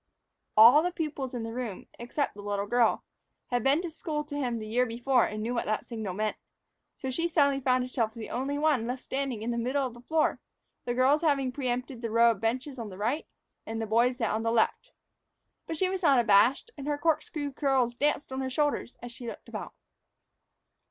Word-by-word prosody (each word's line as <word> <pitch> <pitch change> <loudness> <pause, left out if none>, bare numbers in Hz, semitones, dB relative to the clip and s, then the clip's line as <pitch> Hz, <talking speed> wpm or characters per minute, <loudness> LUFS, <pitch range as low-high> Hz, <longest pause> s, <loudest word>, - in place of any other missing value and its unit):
All 235 +7 +9
the 355 +2 -1
pupils 290 -7 -4
in 235 - -3
the 225 0 -5
room, 235 -6 -5
except 240 +5 -2
the 205 - -10
little 205 0 -2
girl, 235 +1 +2 0.5
had 245 -2 +1
been 280 +6 +3
to 345 - -4
school 310 -1 -3
to 295 -1 -8
him 250 -5 -1
the 215 - -6
year 245 +4 +1
before 240 +2 +2
and 215 0 -5
knew 235 +2 -2
what 235 - -1
the 215 0 0
signal 220 -6 -5
meant. 215 +1 -1 0.6
So 265 - -4
she 335 +6 0
suddenly 280 -5 +3
found 255 -1 +2
herself 235 -3 -2
the 225 -2 -7
only 275 +3 -2
one 290 -6 +2
left 250 +1 -4
standing 265 -5 -3
in 235 - -1
the 235 - -1
middle 265 +4 0
of 250 - -5
the 240 - -13
floor, 315 +5 +1 0.5
the 240 - -1
girls 270 +4 +4
having 280 -5 +1
preempted 250 -1 -3
the 230 - -3
row 230 +1 +5
of 210 - -6
benches 255 +4 -2
on 225 -2 -5
the 185 - -10
right, 235 +10 -1 0.4
and 225 0 -3
the 225 - -1
boys 235 +3 +2
that 225 -5 0
on 220 - -1
the 230 0 0
left. 235 - +1 0.8
But 325 - -4
she 375 - +2
was 380 0 -3
not 285 -6 +5
abashed, 235 - +4
and 275 - -6
her 295 -1 0
corkscrew 300 -1 -1
curls 265 -4 +1
danced 290 +2 0
on 265 - -2
her 260 - -2
shoulders 290 -2 -1
as 245 - -6
she 240 0 -9
looked - - -8
about. - - -7
250 Hz, 220 wpm, -29 LUFS, 230-285 Hz, 0.8 s, All